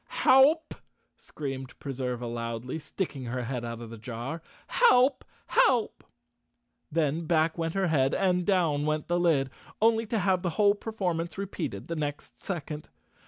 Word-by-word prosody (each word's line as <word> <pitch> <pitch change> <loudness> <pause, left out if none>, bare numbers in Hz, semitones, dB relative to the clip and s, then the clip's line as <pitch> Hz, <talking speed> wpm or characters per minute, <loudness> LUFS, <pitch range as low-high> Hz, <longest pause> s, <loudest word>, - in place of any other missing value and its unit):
"Help!" 285 +5 +4 0.4
screamed 135 -3 -7
Preserva 125 -3 -3
loudly, 115 +4 -4
sticking 150 -3 -4
her 125 +1 -3
head 120 0 -3
out 115 0 -5
of 115 -1 -8
the 115 - -9
jar. 120 +7 -5 0.2
"Help! 280 - +4 0.2
Help!" 435 - +2 0.9
Then 160 +1 0
back 160 -1 +2
went 165 0 -2
her 195 -1 +2
head 135 -4 +2
and 180 -2 +2
down 165 -7 +1
went 155 0 -1
the 175 0 +1
lid, 145 -7 +2 0.3
only 225 0 +3
to 225 - -1
have 190 -2 +2
the 175 - -1
whole 205 -1 +5
performance 185 -6 -3
repeated 200 0 -4
the 170 - -3
next 145 -2 -5
second. 155 -5 -5
160 Hz, 150 wpm, -28 LUFS, 135-195 Hz, 0.9 s, whole